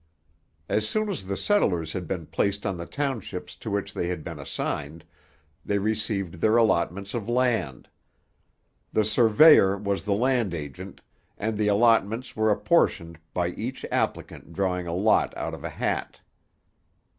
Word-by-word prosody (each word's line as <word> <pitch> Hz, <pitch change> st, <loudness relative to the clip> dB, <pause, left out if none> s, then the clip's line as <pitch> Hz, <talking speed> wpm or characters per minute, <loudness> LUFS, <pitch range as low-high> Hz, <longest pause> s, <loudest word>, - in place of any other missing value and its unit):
As 110 Hz, 0 st, +1 dB
soon 215 Hz, 0 st, 0 dB
as 155 Hz, -, -5 dB
the 100 Hz, -, -2 dB
settlers 90 Hz, -, +1 dB
had 90 Hz, -3 st, -4 dB
been 85 Hz, -2 st, -4 dB
placed 100 Hz, +6 st, -1 dB
on 95 Hz, -2 st, -1 dB
the 85 Hz, -1 st, -7 dB
townships 135 Hz, -7 st, -4 dB
to -, -, -7 dB
which 100 Hz, -1 st, -2 dB
they 85 Hz, -, -2 dB
had 90 Hz, -3 st, -4 dB
been 85 Hz, -3 st, -7 dB
assigned, 70 Hz, +2 st, -4 dB, 0.6 s
they 100 Hz, -, 0 dB
received 100 Hz, -4 st, -2 dB
their 110 Hz, +1 st, +4 dB
allotments 100 Hz, -3 st, +1 dB
of 115 Hz, -2 st, -4 dB
land. 120 Hz, -, 0 dB, 1.0 s
The 110 Hz, -, +2 dB
surveyor 110 Hz, -1 st, +6 dB
was 100 Hz, -3 st, -2 dB
the 100 Hz, 0 st, 0 dB
land 120 Hz, -5 st, +1 dB
agent, 85 Hz, +5 st, -8 dB, 0.4 s
and 110 Hz, +1 st, -2 dB
the 105 Hz, 0 st, 0 dB
allotments 115 Hz, +2 st, +2 dB
were 110 Hz, 0 st, +2 dB
apportioned 100 Hz, -, +1 dB
by 90 Hz, -1 st, 0 dB
each 120 Hz, +8 st, -5 dB
applicant 85 Hz, -, -2 dB
drawing 90 Hz, -1 st, -1 dB
a 85 Hz, -, -2 dB
lot 105 Hz, +4 st, +2 dB
out -, -, -4 dB
of -, -, -8 dB
a -, -, -3 dB
hat. -, -, -3 dB
100 Hz, 155 wpm, -26 LUFS, 90-110 Hz, 1.0 s, surveyor